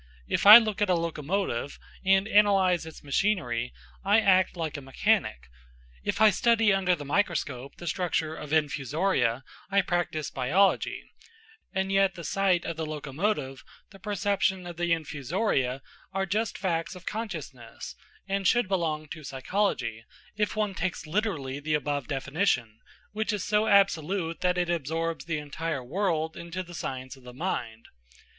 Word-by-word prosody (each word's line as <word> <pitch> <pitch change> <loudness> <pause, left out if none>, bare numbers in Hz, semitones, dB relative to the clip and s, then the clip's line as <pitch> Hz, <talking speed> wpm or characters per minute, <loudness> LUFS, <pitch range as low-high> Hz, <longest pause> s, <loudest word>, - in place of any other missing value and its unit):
If - - +1
I 210 +2 +14
look 215 -4 0
at 205 - +2
a 180 - +4
locomotive, 165 -4 -2 0.3
and 195 0 +4
analyse 195 -6 +4
its 160 - -11
machinery, 140 - 0 0.3
I 205 +3 +5
act 185 -3 +3
like 160 -3 -3
a 145 - -5
mechanic; 130 - 0 0.6
if - - -2
I 220 -1 +7
study 225 0 +3
under 190 -2 +2
the 145 -3 -8
microscope 140 -6 -1
the 175 - -10
structure 165 -3 -1
of 150 -2 -8
infusoria, 150 -3 +1 0.3
I 200 0 +4
practise 175 -4 -2
biology; 165 +10 +1 0.7
and 190 0 -1
yet 195 -1 +3
the 170 - -8
sight 185 0 +1
of 165 -1 -4
the 160 - -2
locomotive, 150 -1 -3 0.3
the 195 - -14
perception 200 -3 0
of 175 -2 -8
the 175 0 -1
infusoria, 150 - -1 0.3
are 195 0 0
just 210 +3 -1
facts 170 -1 -2
of 180 - -12
consciousness, 155 - -6 0.3
and 195 -1 0
should 240 -4 +3
belong 160 -5 -1
to 155 0 -8
psychology, 135 - -2 0.3
if 210 0 -1
one 210 -2 0
takes 185 -3 -3
literally 155 -7 -2
the 155 +1 0
above 145 -3 -2
definition, 135 - -1 0.3
which 220 +1 -1
is 205 -3 -2
so 210 +1 +1
absolute 190 -4 +2
that 180 0 +1
it 175 -1 +1
absorbs 165 +1 -2
the 165 -2 -2
entire 150 -1 -4
world 160 +1 -1
into 170 +2 -5
the 175 0 -12
science 130 -4 -5
of 135 - -18
the 125 0 -12
mind. 120 -9 -4
170 Hz, 155 wpm, -27 LUFS, 145-195 Hz, 0.7 s, I